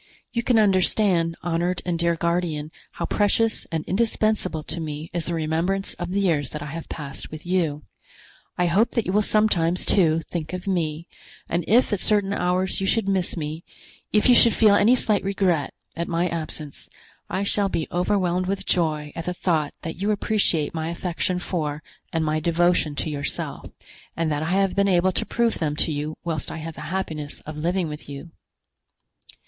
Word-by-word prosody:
You 235 - 0
can 240 0 +2
understand, 185 -4 +3
honored 175 +1 -1
and 175 -2 -1
dear 170 0 +2
guardian, 165 -3 -1 0.2
how - - -3
precious 220 +2 +1
and 160 -2 -2
indispensable 215 -5 0
to 160 +3 -5
me 155 0 -5
is 170 -2 -2
the 170 - -1
remembrance 165 +5 -1
of 175 -1 -5
the 195 +2 0
years 155 -8 +1
that 150 -1 -6
I 150 - -6
have 165 0 -7
passed 140 -3 -6
with 155 +1 -9
you. 165 -5 0 0.7
I 180 - +2
hope 195 +7 +2
that 230 -4 0
you - - -1
will 210 - +4
sometimes, 185 -5 +2
too, 165 -4 +3
think 165 -1 -4
of 180 -1 -5
me, 170 -3 -1 0.4
and 170 +1 -1
if 230 +1 +4
at 205 - 0
certain 205 -1 +1
hours 185 0 0
you 195 - 0
should 220 0 +1
miss 190 -2 0
me, 155 +1 -4 0.5
if 210 +3 +3
you 250 - +7
should 235 -2 +6
feel 215 -3 +6
any 220 +5 +5
slight 215 -4 +2
regret 185 -7 +1 0.2
at 170 +1 -3
my 170 +1 +1
absence, 155 -3 -5 0.4
I 190 - -1
shall 200 0 +1
be 160 -4 -2
overwhelmed 180 0 +1
with 195 0 -2
joy 155 -4 0
at 165 - -5
the 180 - -2
thought 160 -5 0
that 165 +2 -6
you 205 - +1
appreciate 205 -7 +1
my 160 0 -2
affection 175 +1 -1
for 155 -5 -3 0.3
and 160 -1 0
my 155 0 +1
devotion 170 -1 +2
to 140 - -2
yourself, 140 -1 -3 0.5
and 165 -1 0
that 145 0 -1
I 160 - -2
have 195 +1 +2
been 200 0 +3
able 185 0 +3
to - - -1
prove 235 -1 +1
them 150 -2 -1
to 160 - +2
you 150 +1 -3
whilst 160 -3 -3
I - - -5
had 165 +1 -6
the - - -8
happiness 155 -6 -4
of 155 - -8
living 170 +3 0
with 150 -1 -8
you." 140 +4 -8
175 Hz, 190 wpm, -24 LUFS, 155-195 Hz, 0.7 s, you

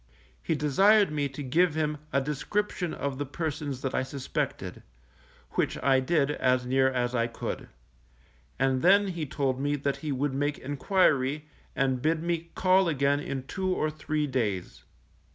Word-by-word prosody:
He 160 - 0
desired 195 +8 +4
me 145 -2 -1
to 140 +2 -7
give 160 +5 +2
him 150 -1 -1
a 140 - +3
description 170 +6 -2
of 140 -1 -4
the 145 - -1
persons 145 -3 -4
that 135 - -2
I - - +1
suspected, 130 0 -4 0.7
which - - 0
I 135 -1 +4
did, 140 +1 +1
as 125 -3 +1
near 130 +1 +3
as 125 -1 -1
I 115 -2 +1
could; 115 - -5 0.9
and 130 -1 +1
then 200 +3 +5
he 170 -4 -4
told 130 -1 -1
me, 145 +1 0
that 140 -1 -1
he 155 -2 -4
would 140 +1 -1
make 145 +2 -1
enquiry, 145 -1 +1 0.3
and 130 -2 +1
bid 160 +2 +1
me 170 -1 -2
call 185 0 +4
again 140 -1 +2
in 140 -2 -4
two 190 +7 -3
or 155 - 0
three 155 0 -2
days. 110 -10 -2
145 Hz, 165 wpm, -28 LUFS, 130-160 Hz, 0.9 s, then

